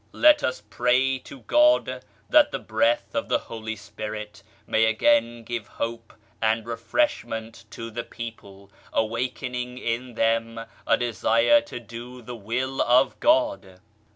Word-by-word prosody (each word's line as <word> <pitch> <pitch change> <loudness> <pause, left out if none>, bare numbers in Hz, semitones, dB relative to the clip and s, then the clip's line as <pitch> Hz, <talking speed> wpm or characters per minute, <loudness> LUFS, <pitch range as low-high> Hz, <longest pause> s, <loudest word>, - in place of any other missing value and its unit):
Let 305 -1 +6
us 130 -5 -2
pray 130 +4 +2
to 135 - -11
God 305 - +3 0.2
that 300 -1 +5
the - - -2
Breath 295 +1 0
of 285 0 -2
the - - +3
Holy 110 -1 -6
Spirit 105 0 -7 0.2
may 110 0 +3
again 115 - +2
give 115 -2 -5
hope 115 0 -5 0.3
and 110 0 +1
refreshment 115 - -2
to 115 +1 -7
the 120 +2 -4
people, 100 -4 -10 0.2
awakening 125 +2 -2
in 120 0 -3
them 115 0 +1 0.3
a - - +4
desire 120 - +3
to 140 -10 -8
do 120 +2 -10
the 120 +2 -7
Will 125 +5 -2
of 125 +2 +3
God. 300 - +1
115 Hz, 135 wpm, -25 LUFS, 110-130 Hz, 0.3 s, Let